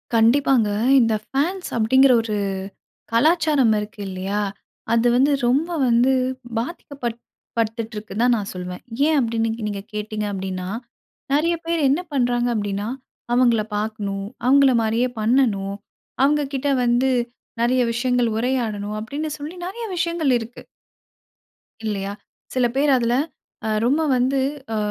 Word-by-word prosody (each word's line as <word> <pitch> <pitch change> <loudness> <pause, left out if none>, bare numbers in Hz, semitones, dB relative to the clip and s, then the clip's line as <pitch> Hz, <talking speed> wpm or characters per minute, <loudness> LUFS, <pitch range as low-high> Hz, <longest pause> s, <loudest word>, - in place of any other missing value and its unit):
கண்டிப்பாங்க. 235 0 +4 0.3
இந்த 230 -2 +3
ஃபேன்ஸ் 350 +8 -1
அப்பிடிங்கிற 260 +4 +5
ஒரு 215 -2 -2 0.8
கலாச்சாரம் 295 -1 +3
இருக்கு 210 0 -7
இல்லையா, 190 +2 -2 0.5
அது 230 +1 +3
வந்து 270 +4 +4 0.2
ரொம்ப 285 +8 +2 0.2
வந்து 240 +2 +4 0.5
பாதிக்கப்பட் 245 -2 -4 0.4
படுத்துட்டுருக்குன்தான் 225 +1 0
நான் 205 -2 -4
சொல்வேன். 180 0 -6 0.3
ஏன்? 315 - +3
அப்பிடின்னு 225 -2 0 0.2
நீங்க 200 -1 -4
கேட்டீங்க 210 0 -3
அப்பிடின்னா, 185 -1 -4 0.6
நெறைய 325 +4 +3
பேரு 335 -1 0
என்ன 290 +6 +2
பண்றாங்க 245 -2 +1
அப்பிடின்னா, 205 -1 -2 0.4
அவுங்கள 240 -3 +4 0.2
பார்க்கணும், 205 -2 -3 0.2
அவுங்கள 275 0 +5
மாரியே 225 +3 +1
பண்ணணும், 215 -4 +1 0.5
அவுங்கக்கிட்ட 285 -1 +1
வந்து 245 +2 +2 0.5
நெறைய 250 +2 +3
விஷயங்கள் 245 0 +1
உரையாடணும், 220 -4 -1
அப்பிடின்னு 285 +8 -4
சொல்லி 305 +5 -6
நெறைய 460 +5 -5
விஷயங்கள் 335 -5 +1
இருக்கு. 230 +1 -9 1.2
இல்லையா. 200 -2 -2 0.4
சில 255 -1 +2
பேர் 280 +1 +3
அதில 235 -1 +1 0.5
அ - - 0 0.2
ரொம்ப 280 +6 +2
வந்து 260 +2 +2 0.4
அ - - 0
240 Hz, 120 wpm, -22 LUFS, 215-275 Hz, 1.2 s, அப்பிடிங்கிற